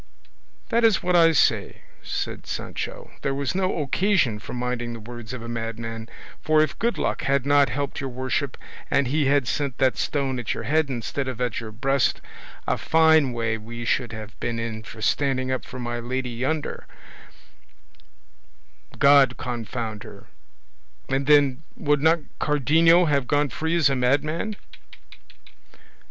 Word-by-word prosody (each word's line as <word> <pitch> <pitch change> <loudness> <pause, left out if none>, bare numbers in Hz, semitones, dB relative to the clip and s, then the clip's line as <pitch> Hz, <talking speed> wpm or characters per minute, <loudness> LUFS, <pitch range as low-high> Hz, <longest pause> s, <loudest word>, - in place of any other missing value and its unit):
"That 235 +1 +2
is 225 -3 +4
what 180 0 +1
I 165 -1 +6
say," 155 - +1 0.2
said - - -4
Sancho; - - -5
"there 135 - -1
was 140 -1 -1
no 185 -4 0
occasion 160 - +1
for - - -9
minding 125 -1 -3
the 115 - -7
words 120 +1 -9
of 125 -2 -6
a - - -7
madman; 115 -1 -5 0.3
for 155 0 +4
if 155 - -4
good 235 +1 0
luck - - -1
had 140 -1 +1
not 145 -1 +4
helped 140 +1 -3
your 135 - -3
worship, 130 +2 -2 0.3
and 140 -1 +2
he 145 +2 +1
had 140 -3 +2
sent 140 -2 -2
that 130 -6 +2
stone 135 -3 -1
at 115 - -2
your - - -5
head 155 0 +1
instead 130 +2 -3
of 130 -2 -5
at 125 -3 -1
your 110 -2 -7
breast, 135 +3 +1 0.5
a - - 0
fine 160 -4 +4
way 115 -2 -1
we 120 +2 -7
should 120 0 0
have 110 -2 -8
been 120 -1 -2
in 115 -1 -4
for 110 0 -10
standing 130 -2 +1
up 130 - -2
for 130 - -9
my 120 -1 -3
lady 125 +1 -3
yonder, 135 +6 -3 2.1
God 140 -3 +5
confound 115 -2 -4
her! - - -12 0.8
And 135 +1 0
then, 145 -2 +4
would 145 -2 +1
not 160 +1 +4 0.2
Cardenio 160 +4 +4
have 140 -4 +1
gone 145 0 +2
free 160 +7 -2
as 165 -4 +4
a 135 - +1
madman?" 150 - 0
135 Hz, 160 wpm, -24 LUFS, 120-150 Hz, 2.1 s, I